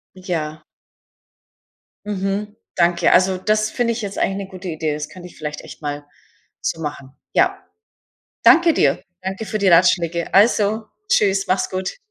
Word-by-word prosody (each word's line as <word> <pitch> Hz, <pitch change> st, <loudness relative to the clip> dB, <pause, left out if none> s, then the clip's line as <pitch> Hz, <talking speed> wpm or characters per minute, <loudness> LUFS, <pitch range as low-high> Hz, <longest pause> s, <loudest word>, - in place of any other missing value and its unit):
Ja. 160 Hz, -5 st, -4 dB, 1.4 s
Mhm. 205 Hz, +1 st, -3 dB, 0.2 s
Danke. 170 Hz, -1 st, +3 dB
Also, 185 Hz, 0 st, +4 dB
das 215 Hz, +2 st, +1 dB
finde 235 Hz, 0 st, 0 dB
ich 230 Hz, -, -5 dB
jetzt 200 Hz, -2 st, -5 dB
eigentlich 195 Hz, +1 st, 0 dB
'ne 195 Hz, -1 st, -5 dB
gute 185 Hz, -1 st, -9 dB
Idee. 155 Hz, -1 st, -2 dB
Das 150 Hz, 0 st, -5 dB
könnte 180 Hz, -1 st, -11 dB
ich -, -, -17 dB
vielleicht 150 Hz, -1 st, -5 dB
echt -, -, -12 dB
mal 145 Hz, 0 st, -4 dB, 0.6 s
so 165 Hz, -, -2 dB
machen. 145 Hz, -3 st, -6 dB, 0.2 s
Ja. -, -, +2 dB, 0.8 s
Danke 335 Hz, -1 st, +6 dB
dir. 140 Hz, +2 st, +2 dB, 0.2 s
Danke 190 Hz, +3 st, -4 dB
für 215 Hz, -, -2 dB
die 200 Hz, -2 st, +3 dB
Ratschläge. 170 Hz, -1 st, +3 dB
Also, 215 Hz, +1 st, +3 dB, 0.2 s
tschüss, 200 Hz, -, +2 dB
mach's 185 Hz, +1 st, +1 dB
gut. 185 Hz, -, -4 dB
185 Hz, 155 wpm, -20 LUFS, 165-205 Hz, 1.4 s, Danke